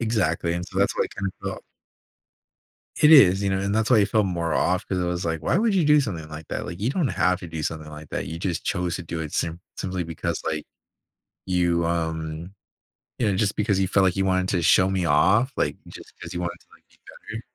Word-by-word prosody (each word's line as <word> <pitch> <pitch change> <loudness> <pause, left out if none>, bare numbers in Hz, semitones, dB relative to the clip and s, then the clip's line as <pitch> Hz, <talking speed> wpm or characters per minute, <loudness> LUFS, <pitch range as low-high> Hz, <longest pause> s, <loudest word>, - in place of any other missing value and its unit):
Exactly. 90 -7 0
And 90 0 -3
so - - -5
that's - - +2
why - - +2
I - - -6
kinda 100 -1 -1
felt. - - -5 1.3
It 150 +1 +6
is, 100 - +7
you 100 - +1
know, 95 - 0
and 100 +1 -1
that's 110 +2 +1
why 115 - +6
I 100 - +5
felt 105 -1 +1
more 85 -2 -2
off 90 +1 +1
'cause 95 - -2
It 90 - 0
was 90 0 -2
like, 80 -1 -2
"Why 170 - +1
would 220 -2 +2
you 175 -5 +3
do 150 0 +5
something 85 - -4
like 75 0 -9
that?" - - -4
Like, 90 +2 -7
you 115 +5 +1
don't 160 -5 0
have 90 0 +1
to 90 - -7
do 80 -1 -5
something 75 0 -4
like 75 -1 -10
that. - - -3
You 80 +1 -6
just 90 -1 -3
chose 90 -2 -1
to 90 - -6
do 80 0 -5
it 80 -2 -5
sim 85 +1 -2 0.2
simply 95 -1 -3
because, 85 0 -4
like, 80 -1 -2 0.8
you, 85 -2 +1
um, 80 +1 -3 0.6
you 115 - +1
know, 95 - 0
just 100 0 0
because 100 -2 +1
you 95 - +2
felt 95 0 +3
like 90 - +2
you 95 - +1
wanted 95 -1 +1
to 90 - +1
show 90 +3 +4
me 95 -2 0
off, 95 - +3
like, - - 0
just - - -12
'cause - - -7
you 90 - -3
wanted 85 -1 -4
to, - - -28
like, - - -22
be - - -27 0.4
better. 115 - -5
90 Hz, 250 wpm, -24 LUFS, 85-100 Hz, 1.3 s, is